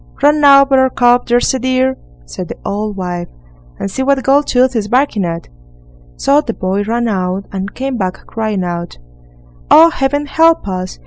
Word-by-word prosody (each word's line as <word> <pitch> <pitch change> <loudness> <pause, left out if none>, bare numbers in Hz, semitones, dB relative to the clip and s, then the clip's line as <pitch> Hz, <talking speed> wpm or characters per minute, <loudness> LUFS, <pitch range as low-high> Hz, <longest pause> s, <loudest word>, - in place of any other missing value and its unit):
"Run 295 +1 +3
out, 275 -1 +6
Buttercup, 250 -2 +3
there's 240 +1 +2
a 260 - -2
dear!" 260 +1 0 0.3
said 175 - -7
the - - -8
old 210 0 -3
wife, 175 -2 -4 0.5
"and 195 - -5
see 265 - -3
what 275 +1 +2
Goldtooth 260 -2 +2
is 215 -3 -1
barking 245 -3 +1
at." 170 -1 -4 0.7
So 285 +2 +2
the 230 -6 -5
boy 190 +2 -2
ran 230 +3 -1
out, 190 -1 -2
and 195 0 -5
came 265 -1 -3
back 185 -3 -4
crying 215 -4 -3
out: 175 -1 -5 0.7
"Oh, 330 +2 +7
Heaven 285 0 -1
help 325 -1 +2
us! 185 -1 -5
240 Hz, 170 wpm, -14 LUFS, 190-270 Hz, 0.7 s, Oh